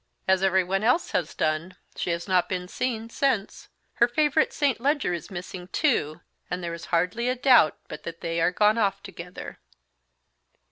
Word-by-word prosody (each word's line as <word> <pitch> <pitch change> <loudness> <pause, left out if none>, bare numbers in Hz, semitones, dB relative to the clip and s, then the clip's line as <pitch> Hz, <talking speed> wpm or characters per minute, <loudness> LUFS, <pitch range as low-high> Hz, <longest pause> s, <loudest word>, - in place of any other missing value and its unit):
"As 190 0 +3
everyone 190 +1 +2
else 250 +10 +2
has - - -1
done. 155 +4 -1 0.2
She - - -3
has 170 0 -2
not 185 -2 +2
been 180 -1 -3
seen 230 +1 -3
since. 245 -8 -1 0.3
Her 235 - +5
favourite 300 +4 +2
St. 280 -6 0
Leger 280 - +1
is 170 - -5
missing 180 -1 -7
too, 175 - 0 0.3
and 180 0 -3
there 170 -1 -3
is 170 - -7
hardly 180 +8 0
a 255 - +1
doubt 250 - +5
but 150 - -8
that 165 +1 -8
they 165 0 -1
are 175 - +3
gone 210 +4 +3
off 200 -2 0
together." 180 -2 -9
190 Hz, 175 wpm, -26 LUFS, 175-240 Hz, 0.3 s, Her